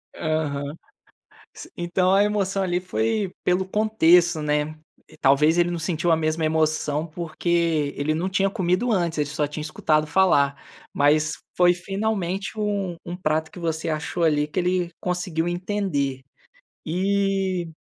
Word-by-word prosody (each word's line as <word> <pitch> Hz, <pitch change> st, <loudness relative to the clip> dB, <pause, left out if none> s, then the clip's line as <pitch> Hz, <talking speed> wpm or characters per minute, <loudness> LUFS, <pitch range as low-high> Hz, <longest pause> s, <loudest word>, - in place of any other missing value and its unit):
Aham. 150 Hz, -2 st, -2 dB, 0.8 s
S -, -, -11 dB
então 180 Hz, +2 st, +1 dB
a 200 Hz, +1 st, +5 dB
emoção 195 Hz, -2 st, 0 dB
ali 180 Hz, -1 st, 0 dB
foi 210 Hz, +1 st, -1 dB
pelo 180 Hz, +1 st, +1 dB
contexto, 180 Hz, -6 st, +3 dB
né. 150 Hz, +1 st, -1 dB, 0.5 s
Talvez 150 Hz, +5 st, +4 dB
ele 175 Hz, 0 st, +3 dB
não 175 Hz, -, -2 dB
sentiu 165 Hz, +1 st, 0 dB
a -, -, +6 dB
mesma 155 Hz, 0 st, 0 dB
emoção 155 Hz, -1 st, 0 dB
porque 165 Hz, -2 st, -1 dB
ele 155 Hz, +2 st, -1 dB
não 175 Hz, +4 st, -1 dB
tinha 195 Hz, +1 st, +1 dB
comido 190 Hz, +4 st, 0 dB
antes, 170 Hz, -5 st, 0 dB
ele 145 Hz, -, +1 dB
só 150 Hz, 0 st, -1 dB
tinha 150 Hz, +1 st, -6 dB
escutado 155 Hz, 0 st, 0 dB
falar. 140 Hz, -7 st, +3 dB, 0.4 s
Mas 150 Hz, +2 st, +3 dB, 0.2 s
foi 175 Hz, 0 st, +5 dB
finalmente 195 Hz, +1 st, -3 dB
um 200 Hz, -4 st, -1 dB
um 175 Hz, -, -5 dB
prato 160 Hz, -3 st, -1 dB
que 180 Hz, -, -10 dB
você 165 Hz, -1 st, -2 dB
achou 155 Hz, +2 st, -2 dB
ali 150 Hz, -2 st, +2 dB
que 185 Hz, -, -3 dB
ele 180 Hz, -1 st, 0 dB
conseguiu 180 Hz, -2 st, -2 dB
entender. 175 Hz, -8 st, -2 dB, 0.6 s
E 190 Hz, 0 st, 0 dB
175 Hz, 145 wpm, -24 LUFS, 155-190 Hz, 0.8 s, a